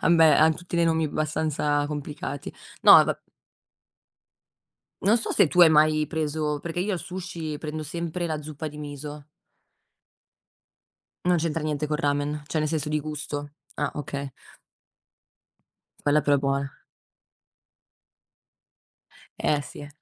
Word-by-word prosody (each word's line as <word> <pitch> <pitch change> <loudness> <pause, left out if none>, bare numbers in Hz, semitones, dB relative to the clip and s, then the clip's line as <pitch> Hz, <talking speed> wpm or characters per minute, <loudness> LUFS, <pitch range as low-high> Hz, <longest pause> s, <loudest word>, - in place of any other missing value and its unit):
Ah - - +2
beh, 165 -2 +6
han 160 +1 +5
tutti 175 0 -6
dei 170 0 +3
nomi 160 -1 +2
bastanza 150 -1 0
complicati. 145 -1 -5 0.3
No - - +8
vab - - -2 1.9
Non 215 +5 +5
so 225 - -4
se - - +5
tu - - -3
hai 170 - +9
mai 155 0 +4
preso 150 -1 -2
perché 170 +2 -5
io 200 +4 0
al 180 - -2
sushi 170 -4 -6
prendo 155 0 -5
sempre 170 +3 -4
la 155 -2 -3
zuppa 155 +1 -6
di 150 0 -11
miso. 145 0 -7 2.0
Non 180 0 +4
c'entra 165 -1 -1
niente 150 -1 -1
col 150 0 -2
ramen, 145 0 -1
cioè, 150 +2 -2
nel 155 - +1
senso 150 -2 -2
di 150 0 0
gusto. 145 -1 -5 0.2
Ah - - -2
okay. 140 -1 -5 1.7
Quella 145 +1 +3
però 145 0 +3
è - - 0
buona. 140 0 -2 2.6
Eh 150 - +1
sì. 145 +2 -10
150 Hz, 135 wpm, -25 LUFS, 145-160 Hz, 2.6 s, hai